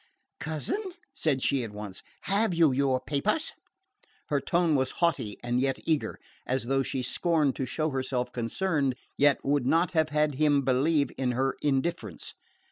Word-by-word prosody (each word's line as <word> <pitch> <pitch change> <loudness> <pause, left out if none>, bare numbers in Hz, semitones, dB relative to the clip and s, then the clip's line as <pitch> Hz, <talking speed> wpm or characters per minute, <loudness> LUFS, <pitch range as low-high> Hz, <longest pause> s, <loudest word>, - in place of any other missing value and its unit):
"Cousin," 160 - -1 0.3
said 150 - 0
she 135 -3 +2
at 115 - -5
once, 105 -2 -7 0.2
"have 200 -1 +1
you 165 -4 +5
your 130 0 +2
papers?" 200 - 0 0.8
Her 145 -3 +1
tone 170 -2 +2
was 130 -2 +2
haughty 160 - 0
and 120 +1 0
yet 135 0 +1
eager, 155 -3 0 0.3
as 130 -1 0
though 135 +2 +1
she 130 -1 -2
scorned 155 0 +1
to 130 - -2
show 155 +4 -1
herself 130 -2 -2
concerned, 135 +3 0 0.2
yet 145 -1 +3
would 140 -2 +1
not 170 +5 +3
have 160 -3 +2
had 150 0 +1
him 145 0 +3
believe 140 +3 +2
in 125 -2 +1
her 135 +2 0
indifference. 145 +3 -1
140 Hz, 160 wpm, -28 LUFS, 130-160 Hz, 0.8 s, you